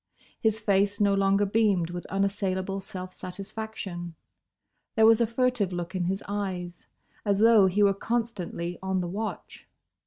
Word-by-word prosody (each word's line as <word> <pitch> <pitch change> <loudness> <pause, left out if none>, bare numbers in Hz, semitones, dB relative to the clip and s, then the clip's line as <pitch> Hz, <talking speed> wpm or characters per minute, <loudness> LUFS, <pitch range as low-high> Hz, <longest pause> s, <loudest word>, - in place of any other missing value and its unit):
His 220 -1 +1
face 200 -1 +2
no 200 -1 +4
longer 195 +1 +3
beamed 200 -5 +2
with 175 0 -6
unassailable 195 -1 -1
self 185 -1 -6
satisfaction. 190 -2 -6 0.8
There 220 - +5
was 225 +1 +6
a 230 - +3
furtive 235 -4 +1
look 175 0 -4
in 185 -2 -1
his 190 +2 -2
eyes, 185 -4 -4 0.4
as 200 -2 +1
though 220 -2 +6
he 200 +3 +2
were 200 -1 +5
constantly 200 -6 -3
on 190 -1 -1
the 175 - -3
watch. 210 +5 -6
195 Hz, 150 wpm, -27 LUFS, 185-215 Hz, 0.8 s, was